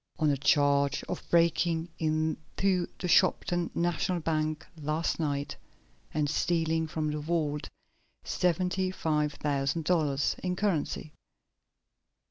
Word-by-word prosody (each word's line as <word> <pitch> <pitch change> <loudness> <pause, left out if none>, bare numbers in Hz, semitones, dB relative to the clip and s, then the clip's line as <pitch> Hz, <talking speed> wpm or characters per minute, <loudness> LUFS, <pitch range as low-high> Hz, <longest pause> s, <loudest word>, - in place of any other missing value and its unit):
"On 155 -1 +3
a 140 - 0
charge 140 0 +3
of 180 - -5
breaking 170 0 +2
into 160 +4 0
the 180 - -3
Shopton 175 -1 +3
National 175 +1 0
Bank 155 0 -1 0.2
last 155 +4 -1
night, 145 -2 -2 0.6
and 150 -1 0
stealing 160 +1 +1
from 155 -1 -2
the 150 - -3
vault 150 -2 -1 0.5
seventy 180 +2 0
five 150 -5 0
thousand 145 +2 -1
dollars 150 -5 +1
in 180 -1 -1
currency!" 175 -5 -1
160 Hz, 110 wpm, -29 LUFS, 150-175 Hz, 0.6 s, On